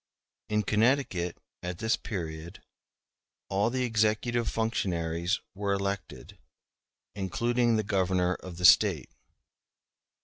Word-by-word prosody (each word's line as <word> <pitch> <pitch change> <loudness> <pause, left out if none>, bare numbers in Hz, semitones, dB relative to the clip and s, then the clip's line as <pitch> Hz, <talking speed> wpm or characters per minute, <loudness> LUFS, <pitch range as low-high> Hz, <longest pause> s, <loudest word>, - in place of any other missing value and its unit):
*b 105 - -1
In 105 - +2
Connecticut, 105 -5 +1 0.2
at 90 0 -5
this 110 +4 +1
period, 85 -3 -6 0.9
all 100 +3 +1
the 130 +1 -1
executive 115 +1 +1
functionaries 90 -5 -1
were 100 0 -1
elected, 100 0 -4 0.7
including 120 +5 +1
the 110 - +1
Governor 95 -2 +1
of 90 -2 -9
the 90 - 0
State. 90 - +5
100 Hz, 105 wpm, -29 LUFS, 90-110 Hz, 0.9 s, State